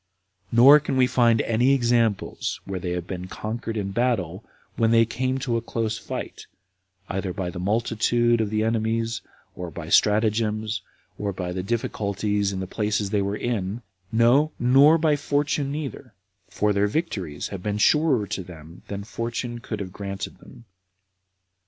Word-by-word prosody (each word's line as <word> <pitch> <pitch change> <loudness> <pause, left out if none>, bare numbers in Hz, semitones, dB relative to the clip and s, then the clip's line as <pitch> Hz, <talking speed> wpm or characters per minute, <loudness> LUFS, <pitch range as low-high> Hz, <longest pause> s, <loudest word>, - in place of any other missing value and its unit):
Nor 135 +6 +8
can 145 -3 -2
we 130 - +5
find 120 -3 +3
any 120 +4 +3
examples 115 -5 0
where 95 -1 -4
they 90 - -4
have 90 -1 -3
been 90 -1 -6
conquered 110 +3 -5
in 100 -2 -2
battle, 105 -5 -1 0.3
when 115 -1 +2
they 115 0 +5
came 130 +3 -1
to 125 -3 -1
a - - -2
close 110 -2 -2
fight, - - -6 0.6
either 95 -1 -3
by 90 -1 -3
the 90 - -7
multitude 115 +3 +1
of 110 - -1
the 110 0 0
enemies, 115 0 0 0.3
or 90 -1 -5
by 85 - -7
their 80 - -8
stratagems, 110 +1 +2 0.4
or 100 -1 -1
by 90 -2 -4
the 90 - -2
difficulties 105 -1 -1
in 95 -1 -4
the - - -3
places 105 0 -1
they 105 - +2
were 100 +1 -2
in; 115 -1 -2 0.3
no, 120 +7 +4
nor 135 +6 +6
by 155 -2 +2
fortune 145 0 0
neither, 140 -4 -6 0.3
for 105 0 +1
their 100 +1 +2
victories 100 - -3
have 100 -3 -6
been 105 +1 -2
surer 140 -1 +3
to 95 - -4
them 85 -1 -12
than 100 0 -5
fortune 115 +3 -4
could 110 -2 -5
have 95 -2 -6
granted 100 -2 -6
them. 120 - -15
110 Hz, 165 wpm, -24 LUFS, 100-120 Hz, 0.6 s, Nor